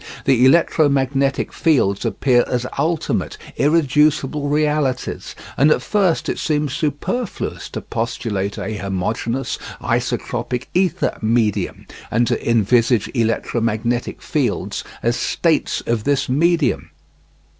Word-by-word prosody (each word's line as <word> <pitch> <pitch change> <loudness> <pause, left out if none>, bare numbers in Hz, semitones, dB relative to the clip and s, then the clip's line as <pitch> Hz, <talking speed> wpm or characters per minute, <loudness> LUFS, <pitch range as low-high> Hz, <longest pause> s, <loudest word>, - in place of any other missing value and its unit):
The 130 -3 +4
electromagnetic 140 -2 +2
fields 130 - +2
appear 125 -3 +3
as 125 -1 -1
ultimate, 165 0 -1 0.2
irreducible 150 -1 +2
realities, 150 -3 -1 0.2
and 145 +3 +5
at - - +2
first 195 -6 +1
it - - -2
seems 150 -3 0
superfluous 155 - -3
to - - -5
postulate 110 -3 -3
a 110 -1 -4
homogeneous, 100 +6 -2 0.2
isotropic 125 +1 -2
ether 185 -1 +1
medium, 110 -4 0 0.2
and 120 +2 +2
to 115 - -1
envisage 115 0 +3
electromagnetic 115 0 -1
fields - - -1 0.2
as - - +1
states - - 0
of 115 -2 0
this 140 +1 +1
medium. 160 +1 +1
130 Hz, 105 wpm, -20 LUFS, 115-150 Hz, 0.2 s, and